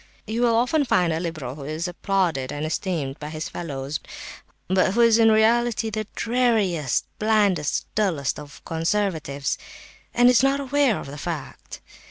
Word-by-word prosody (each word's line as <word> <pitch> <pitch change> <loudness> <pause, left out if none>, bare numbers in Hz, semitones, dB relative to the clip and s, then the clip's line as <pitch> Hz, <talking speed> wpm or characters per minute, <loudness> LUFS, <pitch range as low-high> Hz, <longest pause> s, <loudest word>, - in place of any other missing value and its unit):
(You 225 +2 -2
will 235 -2 +3
often 255 +6 +2
find 180 - +2
a 160 - -1
liberal 155 -7 -4
who 140 0 -9
is 155 +5 -3
applauded 175 -7 -1
and 145 +1 -3
esteemed 155 -4 -2
by 150 - -6
his 155 +1 -5
fellows, 140 -3 -4 0.7
but 185 +1 +2
who 235 - +4
is 230 -1 +5
in 225 0 +6
reality 225 +1 +2
the 215 -1 -3
dreariest, 220 - +1
blindest, 205 -8 +2
dullest 170 -12 0
of 145 -1 -12
conservatives, 165 -5 -1 0.5
and 245 +1 +4
is 250 -1 +6
not 275 +1 +2
aware 280 -4 +2
of - - -7
the 140 +1 -8
fact.) 160 -4 -6
185 Hz, 160 wpm, -24 LUFS, 155-225 Hz, 0.7 s, in